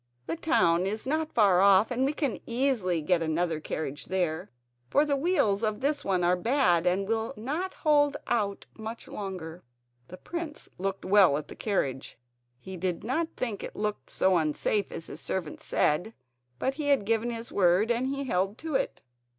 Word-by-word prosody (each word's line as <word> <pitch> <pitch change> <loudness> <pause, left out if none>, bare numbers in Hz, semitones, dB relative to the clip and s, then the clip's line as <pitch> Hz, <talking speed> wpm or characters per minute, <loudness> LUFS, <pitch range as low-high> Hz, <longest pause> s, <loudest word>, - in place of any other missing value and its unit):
The - - -2
town 185 - +2
is 215 +2 -3
not 310 +3 -1
far 195 -5 +4
off 200 +3 +5
and 250 +2 +1
we 280 - +1
can 285 -6 -2
easily 230 - +1
get 175 +1 +2
another 165 0 0
carriage 145 -2 -4
there, 180 -1 -1 0.4
for 290 - +4
the 290 -1 +1
wheels 270 - +2
of 215 -2 -1
this 285 +3 0
one 185 -2 +1
are 175 +1 +4
bad 180 - +2
and 190 +2 +1
will 225 +4 -1
not 305 - -3
hold 290 -2 +3
out 205 -4 -1
much 220 +1 -7
longer." 180 -4 -6 0.4
The 185 - -10
prince 335 - -6
looked 195 +1 -3
well 190 -6 +5
at 150 -1 -7
the - - -9
carriage. 140 - -2 0.4
He 190 +7 -8
did 180 0 -2
not 315 +9 0
think 230 -6 -3
it - - -7
looked 210 0 -3
so 190 -1 +2
unsafe 165 +6 0
as 165 - -6
his - - -8
servant 175 -5 -4
said; 175 +10 0 0.4
but 265 - 0
he 295 +1 -4
had 275 -8 +3
given 230 +2 +1
his 230 0 -5
word 190 +4 +3
and 240 +2 +1
he 275 +1 -2
held 195 -3 0
to 320 -1 -5
it. 270 0 -1
210 Hz, 185 wpm, -28 LUFS, 180-265 Hz, 0.4 s, off